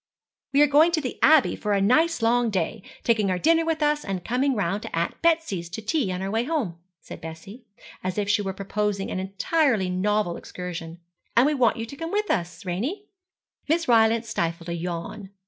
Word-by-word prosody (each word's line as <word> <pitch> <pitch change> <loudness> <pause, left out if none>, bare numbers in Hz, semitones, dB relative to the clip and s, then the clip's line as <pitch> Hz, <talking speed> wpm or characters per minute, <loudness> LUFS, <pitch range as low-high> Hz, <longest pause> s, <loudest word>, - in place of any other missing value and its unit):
'We 285 +2 +6
are - - +5
going 300 +4 +5
to 320 - +2
the 255 - -5
Abbey 310 -3 +5
for 210 -1 -2
a 200 - +2
nice 255 +7 +3
long 240 +1 +3
day, 195 +2 -2 0.2
taking 220 -4 +2
our 185 - +1
dinner 330 - +3
with 320 -1 -1
us, 295 0 +1
and 190 -3 -4
coming 255 +3 +1
round 200 0 -1
to - - -6
Aunt 170 - -2
Betsy's 320 - +1
to 180 - -6
tea 230 -2 0
on 180 +1 -3
our 195 - -3
way 225 +2 +1
home,' 245 - -2 0.2
said - - -11
Bessie, 170 +9 -10 0.4
as 185 +1 -3
if 205 -1 0
she 205 +1 +2
were 195 -1 -2
proposing 200 +1 -2
an 185 - -2
entirely 200 - +1
novel 195 -1 0
excursion; 170 -2 -7 0.4
'and 240 - +7
we 300 - +2
want 245 -6 +2
you 225 - -3
to 255 - -10
come 330 +3 -5
with 420 0 0
us, 175 -4 -2
Ranie.' 265 - -3 0.6
Miss 330 +2 +1
Rylance 230 -1 +4
stifled 170 -5 -2
a - - -2
yawn. 175 +4 -5
215 Hz, 205 wpm, -25 LUFS, 185-285 Hz, 0.6 s, and